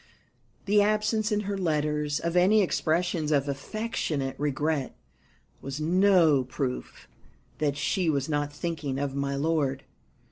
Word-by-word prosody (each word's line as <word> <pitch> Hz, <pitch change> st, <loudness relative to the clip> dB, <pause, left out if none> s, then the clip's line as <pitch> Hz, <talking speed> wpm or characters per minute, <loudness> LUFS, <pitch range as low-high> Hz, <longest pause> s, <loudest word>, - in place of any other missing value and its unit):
The 205 Hz, +1 st, +4 dB
absence, 215 Hz, +1 st, +1 dB
in 210 Hz, 0 st, +1 dB
her 200 Hz, -1 st, -3 dB
letters, 150 Hz, -4 st, 0 dB
of 170 Hz, +1 st, -2 dB
any 195 Hz, +4 st, +5 dB
expressions 170 Hz, -2 st, 0 dB
of 140 Hz, -1 st, +2 dB
affectionate 145 Hz, -3 st, -3 dB
regret 145 Hz, 0 st, -1 dB, 0.7 s
was 135 Hz, +1 st, -5 dB
no 170 Hz, -4 st, +4 dB
proof 130 Hz, 0 st, -5 dB, 0.5 s
that 145 Hz, -1 st, 0 dB
she 170 Hz, +4 st, 0 dB
was 140 Hz, -3 st, 0 dB
not 145 Hz, -1 st, -1 dB
thinking 150 Hz, -3 st, -4 dB
of 140 Hz, -1 st, -2 dB
my 140 Hz, 0 st, -2 dB
lord. 140 Hz, -2 st, 0 dB
155 Hz, 130 wpm, -27 LUFS, 140-185 Hz, 0.7 s, any